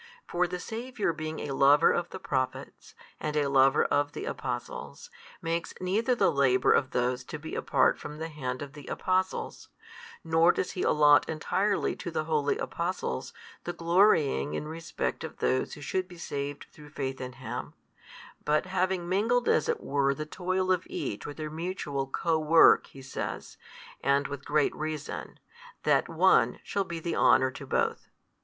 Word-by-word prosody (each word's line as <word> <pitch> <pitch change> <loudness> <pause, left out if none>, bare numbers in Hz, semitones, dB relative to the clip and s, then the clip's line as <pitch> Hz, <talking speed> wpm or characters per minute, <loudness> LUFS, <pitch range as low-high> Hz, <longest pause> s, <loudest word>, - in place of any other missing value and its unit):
For 180 +1 +1
the 180 +1 -4
Saviour 225 -2 -3
being 155 0 -5
a 145 - -4
Lover 140 +2 +5
of 175 0 -1
the - - -7
Prophets, 130 -8 -4 0.2
and 150 0 -3
a 145 -2 +2
Lover 135 0 +4
of 145 0 +1
the - - -5
Apostles, 485 -1 -5 0.3
makes 165 0 -2
neither 215 +7 +1
the - - +3
labour 130 -2 +3
of 130 - +3
those 125 +1 0
to 155 - -6
be 160 +1 -8
apart - - +2
from 150 +1 -8
the 160 +1 -5
hand 130 -4 -4
of 145 0 -10
the 145 -3 -11
Apostles, 185 0 -2 0.5
nor 165 +1 +4
does 180 - -2
He 185 - -4
allot 150 -1 +5
entirely 190 +6 0
to - - -5
the 160 -2 -2
holy 150 -2 0
Apostles 170 - -3 0.3
the 175 - -4
glorying 165 - +3
in 150 - -4
respect 165 +1 -4
of - - -7
those 130 - 0
who 150 - -12
should 185 +5 -2
be 180 -2 -13
saved 145 -3 -5
through 150 -1 -14
faith 135 -3 -4
in 125 0 -6
Him: - - -6 0.7
but 150 +4 +1
having 185 -1 -1
mingled 225 +7 +1
as - - +2
it 470 -2 0
were 140 -1 +1
the 155 - -4
toil 185 +3 -1
of 180 -2 +2
each 100 - -4
with 145 - -8
their 155 -1 -5
mutual 155 -5 -3
co 160 +4 0
work, 160 +1 +6
He 135 - -13
says 135 - -5 0.5
(and 140 0 +2
with 140 -1 -7
great 150 -1 +2
reason) 155 -1 -5 0.4
that - - +2
one - - +3
shall 200 -1 -1
be 170 -2 -5
the 170 +1 -3
honour 130 0 +4
to - - -9
both. - - -1
155 Hz, 175 wpm, -29 LUFS, 140-180 Hz, 0.7 s, work